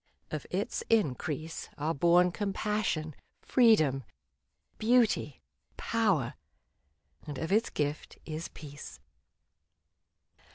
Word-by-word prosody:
Of - - -4
its - - -2
increase 160 - 0
Are 155 +3 0
born 175 +4 +4
compassion, 195 -6 -1 0.3
freedom, 155 - +4 0.8
beauty, 220 - +2 0.3
power; - - +1 0.9
And 145 -2 -5
of 160 +6 -3
its 220 +3 +3
gift 150 0 -3
is 160 +1 -4
peace. 145 -1 -10
160 Hz, 85 wpm, -30 LUFS, 150-210 Hz, 0.9 s, born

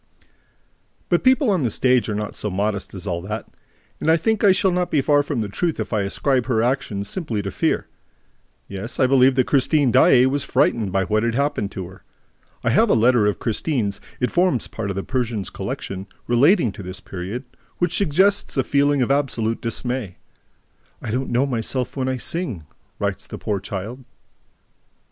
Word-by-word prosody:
But - - +2
people 260 -2 +4
on 185 -5 +1
the 125 - +1
stage 125 +1 +2
are 105 - -1
not 105 0 -3
so 105 - -3
modest 100 +1 -2
as 95 - -5
all 85 -3 -2
that; 105 +4 -5 0.5
and 160 - 0
I 165 - +6
think 220 +6 0
that 205 - +5
I - - +8
shall 190 0 +2
not 180 0 0
be 150 - +2
far 145 +1 +3
from 145 -4 -2
the 105 - -2
truth 160 - -2
if - - -4
I 105 - +2
ascribe 125 +5 0
her 115 -4 +2
action 120 -5 -1
simply 115 - -3
to 95 - -4
fear. - - 0 0.8
Yes, 100 +4 -6
I 130 - +5
believe 130 0 +4
that 130 -1 +3
Christine 140 -1 +2
Daae 125 +2 +6
was 135 +1 0
frightened 110 -5 +1
by 95 +1 +1
what 110 +3 +1
had 115 0 0
happened 140 -7 0
to 95 - -5
her. 95 +2 -14 0.6
I - - +2
have - - +4
a - - +4
letter 115 -1 +4
of 105 - 0
Christine's 110 -4 -2 0.2
(it 125 - 0
forms 175 -8 +2
part 110 -3 -5
of 100 - -3
the 95 - -3
Persian's 120 -7 -2
collection), 95 +1 -5 0.2
relating 125 - +4
to 100 - -10
this 90 0 -6
period, 95 +7 -6 0.3
which 175 - 0
suggests 195 0 +2
a 135 - +3
feeling 140 0 +2
of 125 - -1
absolute 120 -5 0
dismay: 120 -3 -3 0.8
"I 110 - -5
don't 130 +3 -2
know 125 +3 +2
myself 125 +1 -2
when 130 -2 -1
I 130 - -1
sing," 125 - -3 0.3
writes - - -3
the - - -7
poor 100 -2 -2
child. 105 +7 -6
125 Hz, 195 wpm, -22 LUFS, 105-140 Hz, 0.8 s, I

